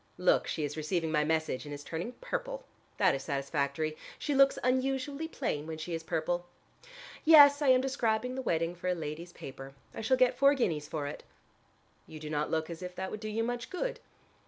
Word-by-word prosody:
Look, 180 0 +3
she 155 - -2
is 145 0 -3
receiving 160 +1 -1
my 150 -1 +3
message, 160 -4 0
and 145 - -8
is 145 0 -6
turning 170 +11 -4
purple. - - -5 0.3
That - - +4
is 135 - -2
satisfactory. 140 +2 -1 0.2
She 295 - -2
looks 275 0 +5
unusually 270 +4 0
plain 160 - -3
when 160 -1 -5
she 160 +2 -5
is 165 - -2
purple. 175 +2 -2 0.8
Yes: 290 -2 +8
I 290 - +2
am 255 -1 +6
describing 250 -2 0
the 265 - -3
wedding 165 -7 0
for 175 +1 -6
a 180 - +2
lady's 165 +2 -6
paper. 135 -3 -9 0.2
I - - -5
shall 255 +4 +2
get 255 -1 +4
four 280 +1 +6
guineas 160 - 0
for 150 -2 -3
it." 145 - -6 0.9
"You 155 - -9
do 150 0 -6
not 150 0 0
look 160 -1 0
as 170 0 -7
if 180 0 -6
that 190 +1 -4
would 215 - -5
do 215 0 -5
you 225 +2 -1
much 240 +1 -3
good." 485 +6 -3
175 Hz, 205 wpm, -31 LUFS, 155-260 Hz, 0.9 s, Yes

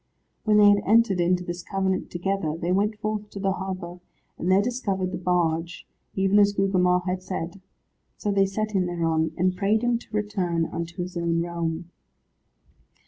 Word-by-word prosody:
When 210 -1 +4
they 205 0 +7
had 205 0 +5
entered 215 -4 +4
into 180 +1 +2
this 175 0 -5
covenant 190 0 -1
together, 175 -3 -2
they 170 +1 -2
went 205 +3 +1
forth 210 -1 -3
to 200 - -8
the 195 0 +1
harbour, 185 -2 -5 0.4
and 175 - -1
there 190 - +6
discovered 200 -5 -1
the - - -4
barge, 170 -2 0 0.3
even 195 +1 +3
as 205 0 +5
Gugemar 185 -2 +2
had 185 0 -2
said. 185 0 -5 0.6
So 205 - -1
they 195 -1 +3
set 215 +2 -2
him 190 -3 +1
thereon, 165 -2 0
and 185 +1 +1
prayed 210 +4 +1
him 240 -1 +2
to - - -16
return 180 -5 -1
unto 170 +2 -4
his 180 +1 -8
own 170 -1 0
realm. 170 0 -4
185 Hz, 175 wpm, -25 LUFS, 175-200 Hz, 0.6 s, they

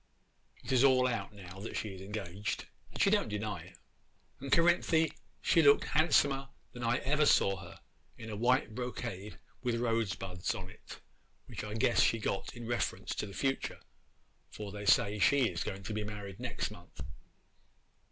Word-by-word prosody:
It - - -5
is 130 0 +4
all 130 -2 +5
out 120 -3 -1
now 95 -2 -11
that 105 - -5
she 110 - -3
is 95 -1 -9
engaged, 100 -1 -4 0.3
and - - -9
she 195 - +4
don't 205 - +2
deny 105 0 -3
it. - - -15 0.6
'And 135 0 -6
Cerinthy, 165 -1 +4 0.3
she 165 - +5
looked 145 -2 +6
handsomer 140 -3 +3 0.2
than 120 - -8
I 115 - +2
ever 150 +2 +3
saw 95 -1 +4
her, - - -11 0.4
in 110 -1 -7
a - - -4
white 120 +1 +2
brocade 115 -4 -5 0.2
with 120 -2 0
rosebuds 100 -6 -1
on 95 0 -7
it, - - -12 0.5
which - - -7
I 105 0 -5
guess 115 +1 +3
she 115 - +4
got 105 0 -3
in 120 -1 -7
reference 120 +1 -2
to 105 - -3
the 100 - -10
future, 135 -1 -1 0.7
for 105 -2 -7
they 105 0 -6
say 105 +1 +4
she 135 +4 +4
is 85 -4 -3
going 95 0 -5
to 105 - -4
be 105 0 -2
married 105 -1 -7
next 120 -4 -3
month. 85 -4 -12
110 Hz, 175 wpm, -32 LUFS, 100-130 Hz, 0.7 s, looked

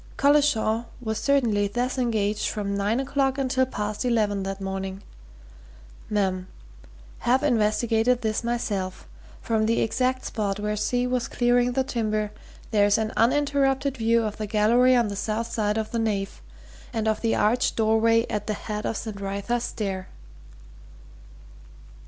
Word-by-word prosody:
Collishaw 280 -6 +3
was 220 -3 -3
certainly 235 -8 +2
thus 245 +5 -2
engaged 215 -4 0
from 200 -2 -3
nine 205 +4 0
o'clock 270 0 0
until 260 -1 +1
past 210 -2 -3
eleven 215 -5 +1
that 195 0 -4
morning. 195 0 -4 1.1
Mem. 190 -3 0 0.7
Have 255 +3 +2
investigated 230 -1 +2
this 220 +1 -1
myself. 205 -6 -3 0.4
From 220 -2 +1
the 230 - +2
exact 255 +3 0
spot 205 -3 -2
where 210 0 -1
C. 245 +4 0
was 250 -1 -1
clearing 245 0 +2
the 265 +1 +1
timber, 215 -4 -1 0.4
there 205 -2 +4
is 205 - +3
an 220 0 -2
uninterrupted 275 +1 +2
view 230 -1 +2
of 215 -1 -3
the 215 - -4
gallery 235 +5 +4
on 240 -3 +3
the 200 - -4
south 225 +3 -2
side 210 -1 0
of 220 -1 -3
the 235 - -1
nave, 200 - -2 0.5
and 220 -1 -2
of 220 -1 0
the 230 - +1
arched 230 +4 +2
doorway 225 +1 +3
at 210 -1 -3
the 215 - -1
head 210 +1 -4
of 225 - -2
St. 210 -3 -6
Wrytha's 200 +5 -2
Stair.'" 190 -3 -4
220 Hz, 150 wpm, -25 LUFS, 210-245 Hz, 1.1 s, there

